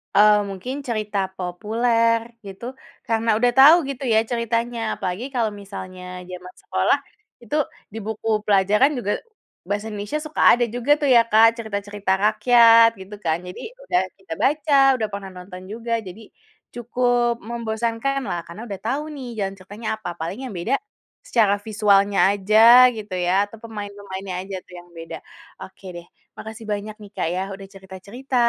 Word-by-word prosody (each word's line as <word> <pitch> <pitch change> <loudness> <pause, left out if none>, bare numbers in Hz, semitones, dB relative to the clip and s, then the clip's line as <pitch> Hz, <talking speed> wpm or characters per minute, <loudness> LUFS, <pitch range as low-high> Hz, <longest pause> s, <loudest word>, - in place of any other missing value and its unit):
Eee, 210 0 +6
mungkin 195 +8 -6
cerita 215 -3 -2 0.2
populer 230 +5 +1 0.3
gitu 195 +4 -9 0.4
karena 225 0 0
udah 245 +1 +3
tau 290 +5 +9
gitu 275 0 -6
ya 220 - +5
ceritanya, 235 0 -1 0.2
apalagi 190 +6 -4
kalau 225 -3 +1
misalnya 185 -2 -9 0.3
zaman 180 0 -9
sekolah, - - +1 0.5
itu 235 - -4 0.4
di - - -6
buku 220 0 -5 0.2
pelajaran 210 +7 +4
juga 205 -4 -2 0.6
bahasa 205 +1 -2
Indonesia 210 +9 -4
suka 305 0 -4
ada 240 - 0
juga 245 +4 0
tuh 285 - +1
ya, 235 - +8
Kak, 225 +1 +6
cerita-cerita 205 -2 -4
rakyat 230 +1 +6
gitu 195 +2 -9
kan. 160 0 +1
Jadi 180 - -8 0.2
udah 180 - +1 0.2
kita 190 -4 -8
baca, 290 0 +2 0.2
udah 220 -3 -2
pernah 200 -1 -6
nonton 180 0 -10
juga, 230 +1 -6 0.2
jadi 195 +5 -10 0.5
cukup 240 0 +1
membosankanlah 230 0 -2
karena 170 +6 -10
udah 195 -3 -6
tahu 275 +6 -1
nih 260 -3 -7 0.2
jalan 195 0 -3
ceritanya 205 +4 -9
apa. 180 - -6
Paling 170 +8 -4
yang 220 - -8
beda, 175 +9 -2 0.5
secara 205 -4 +2
visualnya 200 -2 +3
aja 220 +5 +7
gitu 210 -2 -8
ya 185 +3 +2
atau 220 +2 -14
pemain-pemainnya 200 -3 -7
aja 195 - -5
tuh 180 - -18
yang 175 0 -17
beda. 165 0 -8 0.4
Oke 190 0 -12
deh, 175 0 -9 0.3
makasih 220 +1 -9
banyak 210 +1 -4
nih 205 - -13
Kak - - -1
ya 185 - -1
udah 195 0 -11
cerita-cerita 195 +8 -8
215 Hz, 155 wpm, -22 LUFS, 195-235 Hz, 0.6 s, tau